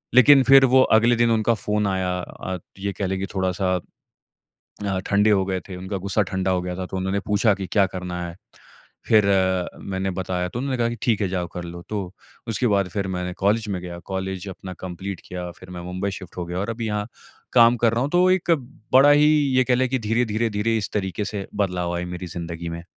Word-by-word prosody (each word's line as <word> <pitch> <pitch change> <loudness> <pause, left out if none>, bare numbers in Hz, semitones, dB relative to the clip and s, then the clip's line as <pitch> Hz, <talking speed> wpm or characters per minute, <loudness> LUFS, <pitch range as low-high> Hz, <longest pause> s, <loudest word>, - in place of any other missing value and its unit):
लेकिन 135 +2 +8
फिर 135 +1 +7
वो 130 +1 +5 0.2
अगले 120 +2 +4
दिन 120 0 +3
उनका 110 +1 +2
फ़ोन 105 -1 -1
आया। 95 -1 -1
अ, 90 +1 -6 0.2
ये 100 0 -2
कह 95 +1 -2
लें 95 0 -2
कि 95 - -2
थोड़ा-सा 95 0 0 0.9
अ, 100 -2 -4
ठंडे 105 +2 +3
हो 95 -2 +3
गए 95 -1 -1
थे। 95 - -6
उनका 95 +2 -5
गुस्सा 100 +3 0
ठंडा 95 0 0
हो 90 -1 0
गया 90 0 -4
था 95 0 -4
तो 95 - -6
उन्होंने 95 +2 -1
पूछा 105 +1 +3
कि, 95 -1 -5
"क्या 100 +1 +3
करना 90 -2 -5
है?" 85 0 -9 0.7
फिर 105 -2 +5 0.7
मैंने 95 0 -1
बताया 90 -1 -2
तो 110 - -6
उन्होंने 130 0 -2
कहा 115 -1 +2
कि, 120 - -5
"ठीक 115 -5 +1
है 95 - +1
जाओ 90 -1 -2
कर 90 - -5
लो।" 85 0 -8
तो 100 -4 -4 0.4
उसके 115 +3 0
बाद 100 -3 +2
फिर 100 +1 -2
मैंने 90 0 -3
कॉलेज 110 +2 +2
में 95 -3 -2
गया। 85 -1 -7
कॉलेज 95 0 -4
अपना 95 0 -8
कम्पलीट 95 +1 -6
किया। 90 -1 -5
फिर 95 - -12
मैं 90 -1 -7
मुंबई 95 +2 -2
शिफ्ट 90 - -12
हो 90 - -2
गया 90 +1 -4
और 100 - -2
अभी 115 0 -4
यहाँ 105 0 -2 0.5
काम 120 0 +7
कर 115 -1 +2
रहा 115 - 0
हूँ। 140 - -1
तो 180 +1 +4
एक 185 -2 +1 0.4
बड़ा 140 +3 +8
ही 145 +1 +6 0.3
ये 130 - +5
कह 125 0 +2
लें 130 +1 +1
की 130 +1 0
धीरे-धीरे 115 0 +1
धीरे 105 +2 0
इस 105 - -4
तरीके 100 -1 -2
से 100 -2 -4
बदलाव 90 -3 -1
आए 90 - -2
मेरी 90 +1 -6
ज़िन्दगी 85 0 -6
में। 85 +1 -6
100 Hz, 225 wpm, -23 LUFS, 90-115 Hz, 0.9 s, लेकिन